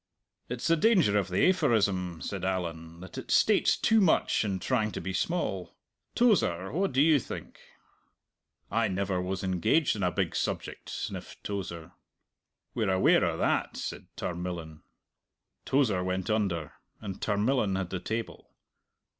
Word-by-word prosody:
"It's 120 Hz, 0 st, -4 dB
the 165 Hz, -, +4 dB
danger 170 Hz, -, +4 dB
of 100 Hz, -2 st, +1 dB
the 90 Hz, -, +3 dB
aphorism," 100 Hz, -, +1 dB
said -, -, -4 dB
Allan, 85 Hz, -3 st, -3 dB
"that 95 Hz, -, -8 dB
it -, -, -10 dB
states -, -, +4 dB
too 225 Hz, -1 st, +3 dB
much 170 Hz, -, +3 dB
in 100 Hz, -3 st, -1 dB
trying 110 Hz, +1 st, 0 dB
to -, -, -4 dB
be 95 Hz, +2 st, -4 dB
small. 95 Hz, -, -2 dB, 0.4 s
Tozer, 95 Hz, -, +2 dB
what 190 Hz, +6 st, 0 dB
do 135 Hz, +2 st, +4 dB
you 155 Hz, -2 st, +5 dB
think?" -, -, -8 dB, 1.1 s
"I 115 Hz, +1 st, +2 dB
never 95 Hz, -1 st, -1 dB
was 95 Hz, +1 st, -3 dB
engaged 95 Hz, -, +2 dB
on 105 Hz, -, -4 dB
a 90 Hz, -, +2 dB
big -, -, -1 dB
subject," -, -, -3 dB
sniffed -, -, -6 dB
Tozer. 85 Hz, -5 st, -5 dB, 0.8 s
"We're 110 Hz, -4 st, 0 dB
aware 95 Hz, 0 st, +4 dB
o' -, -, 0 dB
that!" -, -, 0 dB
said -, -, -6 dB
Tarmillan. 85 Hz, -3 st, -5 dB, 0.8 s
Tozer 115 Hz, -10 st, +2 dB
went 95 Hz, +3 st, -2 dB
under, 90 Hz, -9 st, -1 dB, 0.3 s
and 100 Hz, -3 st, -7 dB
Tarmillan 105 Hz, 0 st, +1 dB
had 95 Hz, -2 st, -3 dB
the 90 Hz, -, -2 dB
table. 110 Hz, +4 st, -5 dB
95 Hz, 145 wpm, -29 LUFS, 90-120 Hz, 1.1 s, you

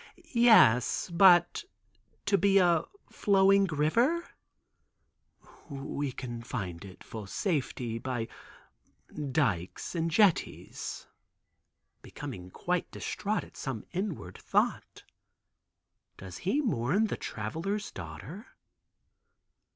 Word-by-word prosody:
"Yes, 205 Hz, -, +5 dB
but 175 Hz, -, +5 dB, 0.6 s
to 200 Hz, -, +3 dB
be 195 Hz, +1 st, +4 dB
a 175 Hz, -4 st, +4 dB, 0.3 s
flowing 195 Hz, 0 st, +4 dB
river?" 230 Hz, -, +1 dB, 1.4 s
"We 140 Hz, 0 st, -4 dB
confined 115 Hz, -8 st, -6 dB
it 95 Hz, -2 st, -12 dB
for 110 Hz, -3 st, -8 dB
safely, 125 Hz, -, -2 dB
by 120 Hz, -2 st, -3 dB, 1.0 s
dykes 105 Hz, -, -1 dB
and 165 Hz, -1 st, -1 dB
jetties," 185 Hz, +2 st, 0 dB, 1.0 s
becoming 90 Hz, 0 st, -8 dB
quite 180 Hz, -, -2 dB
distraught 210 Hz, +1 st, -3 dB
at -, -, -16 dB
some 130 Hz, -6 st, -5 dB
inward 175 Hz, -, -4 dB
thought. -, -, -1 dB, 1.1 s
Does 95 Hz, -2 st, -9 dB
he 205 Hz, -, 0 dB
mourn 200 Hz, -, +1 dB
the -, -, -2 dB
Traveler's 165 Hz, -, -4 dB
daughter? 95 Hz, -, -9 dB
160 Hz, 90 wpm, -30 LUFS, -, 1.4 s, Yes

